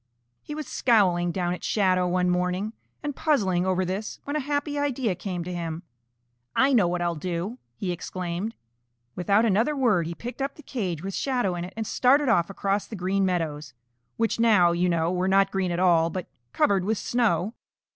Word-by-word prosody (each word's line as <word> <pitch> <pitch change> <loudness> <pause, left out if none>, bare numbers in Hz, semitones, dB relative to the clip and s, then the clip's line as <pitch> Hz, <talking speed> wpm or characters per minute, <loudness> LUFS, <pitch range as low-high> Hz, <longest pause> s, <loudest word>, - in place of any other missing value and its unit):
He 300 - -7
was 305 -1 -4
scowling 180 -8 +2
down 175 -1 -1
at 180 - -7
Shadow 185 -3 +2
one 180 0 +1
morning 180 +4 0 0.3
and 290 -2 -3
puzzling 190 - +1
over 185 0 +1
this 195 +4 -4
when 285 - -4
a - - +2
happy 290 +1 -2
idea 265 -7 0
came 180 -1 -4
to 180 +1 -5
him. 165 -1 -4 0.7
"I 270 +1 +4
know 210 -8 +5
what 175 0 -1
I'll 170 0 0
do!" 180 - -4 0.2
he 180 +7 -3
exclaimed. 180 +4 -4 0.6
Without 200 +5 +3
another 225 +8 +2
word 215 - +2
he 170 - -5
picked 245 +7 -7
up 275 +1 -2
the 300 - -14
cage 185 - -3
with 195 0 -4
Shadow 245 -8 0
in 175 0 -4
it 185 - -10
and 220 - -2
started 265 +5 +3
off 175 -6 +3
across 195 +1 -1
the 220 - -7
Green 190 +1 0
Meadows, 155 -6 -2 0.4
which 225 0 0
now, 210 -7 +5
you 175 +1 +1
know, 165 0 +1
were 185 +1 0
not 195 0 +4
green 190 -2 0
at 170 - -1
all 170 -3 +4
but 180 +1 -4 0.3
covered 195 +5 +2
with 215 +3 0
snow. 215 -5 0
190 Hz, 195 wpm, -26 LUFS, 175-230 Hz, 0.7 s, know